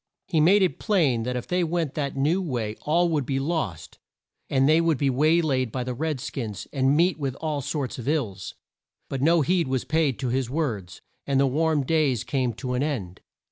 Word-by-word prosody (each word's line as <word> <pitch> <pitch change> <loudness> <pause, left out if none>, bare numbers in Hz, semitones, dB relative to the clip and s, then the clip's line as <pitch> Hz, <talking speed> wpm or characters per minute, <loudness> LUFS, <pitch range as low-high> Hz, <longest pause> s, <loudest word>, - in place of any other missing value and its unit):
He 170 -5 0
made 190 +6 +5
it 185 - 0
plain 160 - +2
that 125 +2 -3
if 125 - -3
they 180 0 0
went 165 -3 -1
that 140 -2 -3
new 155 +8 +2
way 120 - -3
all 170 +4 +2
would 155 -4 0
be 135 +1 -1
lost, 140 - -3 0.5
and 135 0 +3
they 155 +2 +5
would 165 -3 +2
be 140 -1 +1
way 155 +6 +3
laid 130 -6 0
by 125 +1 -2
the 125 0 -3
red 150 +2 -2
skins 115 -7 -5
and 135 +1 +2
meet 175 0 +2
with 135 -3 -2
all 150 -2 -3
sorts 140 -2 -3
of 120 - -7
ills. 110 -11 -2 0.5
But 135 - -3
no 165 +3 +4
heed 170 +2 +1
was 130 -1 -1
paid 155 -5 +1
to 130 -2 -2
his 130 0 -1
words, 115 - -3 0.3
and 135 -1 +2
the 140 - +4
warm 150 +2 +1
days 145 -7 +1
came 130 -3 -1
to 125 +3 -4
an 125 - 0
end. 115 - -3
140 Hz, 215 wpm, -25 LUFS, 125-160 Hz, 0.5 s, made